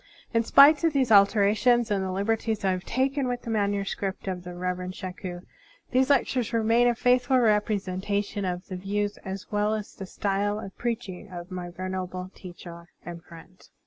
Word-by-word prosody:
In 230 0 +3
spite 285 +6 +7
of 330 -2 +3
these 260 -4 +1
alterations 215 +3 +4
and 195 -2 +1
the 190 - -3
liberties 215 +2 -1
I 190 - +3
have 185 0 -3
taken 265 +2 0
with 245 0 -3
the 230 - -4
manuscripts 200 -2 -2
of 180 -2 -3
the 180 0 -8
Rev 180 0 -2
erend 185 0 -6
Shaku, 180 -1 -6 0.5
these 260 +1 +3
lectures 255 -4 +1
remain 230 +2 +3
a 240 - +2
faithful 250 +2 +3
ref)resentation 205 -2 0
of 180 0 -3
the 185 - -6
views 205 +2 -2
as 190 0 -8
well 210 +1 +1
as 210 -1 -6
the 195 - -8
style 205 +2 -1
of 195 -3 -9
preaching 220 -5 -4
of 175 0 -9
my 180 -1 -5
venerable 185 0 -5
teacher 175 -2 -11 0.2
and 170 -1 -8
friend. 170 +1 -15
200 Hz, 175 wpm, -26 LUFS, 185-230 Hz, 0.5 s, spite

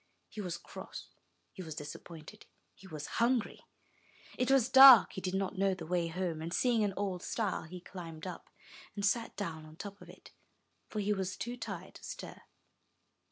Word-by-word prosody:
He 215 - -6
was 180 -3 -4
cross, - - -9 0.4
he 190 - -8
was 160 -4 -7
disappointed, 155 +5 -9 0.3
he 195 - -15
was 155 -4 -6 0.2
hungry. 240 -1 +1 0.7
It 250 - 0
was 270 -3 +5
dark, 265 -4 +10
he 190 - -5
did 185 0 -2
not 195 0 -2
know 195 -1 +2
the 170 -3 -8
way 175 0 0
home, 165 -2 -3
and, 165 +1 -5
seeing 235 +2 +2
an 200 -2 -1
old 190 -3 -2
stile, 205 -6 -2
he 180 +3 -8
climbed 170 -4 -9
up, 180 - -7 0.5
and 200 -1 -1
sat 225 +4 0
down 165 -6 -4
on 155 0 -13
the - - -18
top 200 +1 -8
of - - -13
it, - - -15 0.6
for 215 - -2
he 205 +1 +1
was 190 -2 -3
too 240 +1 -4
tired 245 - -7
to - - -14
stir. - - -8
190 Hz, 190 wpm, -33 LUFS, 170-210 Hz, 0.7 s, dark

